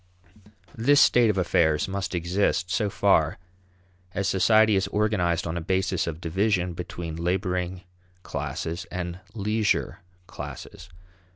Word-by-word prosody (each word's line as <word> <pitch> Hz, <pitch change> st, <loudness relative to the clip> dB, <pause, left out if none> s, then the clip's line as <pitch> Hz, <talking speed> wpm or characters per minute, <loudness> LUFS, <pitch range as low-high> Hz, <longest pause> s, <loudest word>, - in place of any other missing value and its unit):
This 140 Hz, +6 st, +4 dB
state 120 Hz, -2 st, +5 dB
of 100 Hz, -, 0 dB
affairs 80 Hz, -3 st, +2 dB
must 95 Hz, -1 st, -3 dB
exist 90 Hz, +1 st, 0 dB
so 105 Hz, +1 st, +1 dB
far -, -, +2 dB, 0.8 s
as 100 Hz, -1 st, 0 dB
society 110 Hz, +3 st, +4 dB
is 95 Hz, -, +1 dB
organized 95 Hz, -6 st, 0 dB
on 85 Hz, 0 st, -3 dB
a -, -, -3 dB
basis 95 Hz, +1 st, 0 dB
of 80 Hz, -1 st, -4 dB
division 90 Hz, +1 st, 0 dB
between 85 Hz, -1 st, -6 dB
laboring 90 Hz, +1 st, -2 dB, 0.4 s
classes 85 Hz, +1 st, -4 dB
and 90 Hz, 0 st, -5 dB, 0.2 s
leisure 105 Hz, 0 st, 0 dB, 0.3 s
classes. -, -, -9 dB
95 Hz, 120 wpm, -25 LUFS, 85-100 Hz, 0.8 s, state